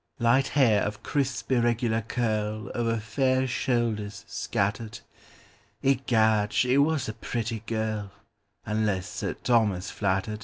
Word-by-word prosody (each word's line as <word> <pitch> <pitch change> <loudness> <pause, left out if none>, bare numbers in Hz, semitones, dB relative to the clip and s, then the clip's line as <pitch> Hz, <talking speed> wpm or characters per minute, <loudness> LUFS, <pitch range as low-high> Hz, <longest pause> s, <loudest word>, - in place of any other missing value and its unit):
Light 130 +3 +3
hair 120 -8 +3
of 105 0 -3
crisp 135 -2 -2
irregular 120 -2 +2
curlOver 110 0 -1
fair 130 +4 +1
shoulders 120 -5 -1
scattered—Egad, 110 +2 -1
she 125 +2 +3
was 150 -2 +2
a 110 - -3
pretty 115 0 -3
girl, 110 -3 -2 0.5
Unless 105 -4 0
Sir - - -3
Thomas 105 -6 +1
flattered! 100 +2 -1
115 Hz, 105 wpm, -27 LUFS, 105-125 Hz, 0.5 s, Light